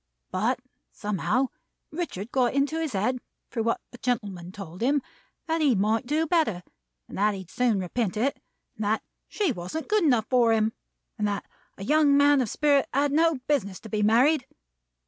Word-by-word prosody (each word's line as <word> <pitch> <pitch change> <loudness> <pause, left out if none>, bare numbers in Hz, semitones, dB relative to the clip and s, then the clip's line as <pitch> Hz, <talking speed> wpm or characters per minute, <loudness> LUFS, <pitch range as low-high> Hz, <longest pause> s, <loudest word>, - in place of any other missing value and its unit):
But, 225 +8 0 0.3
somehow, 215 +5 0 0.4
Richard 270 - -4
got 250 -2 +2
it - - -7
into 285 +3 +1
his 315 -6 -2
head, 220 +6 0 0.3
through 230 - -1
what 230 +1 0
the 245 - -12
gentleman 205 -8 -2
told 185 -2 -9
him, 275 +3 +2 0.4
that 325 0 0
he 280 -6 +4
might 220 +5 +1
do 310 +4 +1
better, 305 - +1 0.4
and - - -10
that 210 0 +3
he'd 190 -3 -9
soon 240 -5 +2
repent 190 +2 -2
it, 265 +6 0 0.3
and 215 - -4
that 215 +2 0 0.2
she 405 -7 0
wasn't 215 - -5
good 425 -2 +3
enough 245 -8 +3
for 240 -3 +4
him, 220 0 +2 0.5
and 210 - +1
that 205 -1 -2 0.3
a 195 - -7
young 290 +3 +4
man 285 -1 +5
of 240 - -1
spirit 285 +1 +2
had 280 +2 +2
no 325 +2 +3
business 200 -11 0
to 220 - -10
be 215 -1 -1
married. 250 +7 +4
245 Hz, 185 wpm, -26 LUFS, 210-290 Hz, 0.5 s, man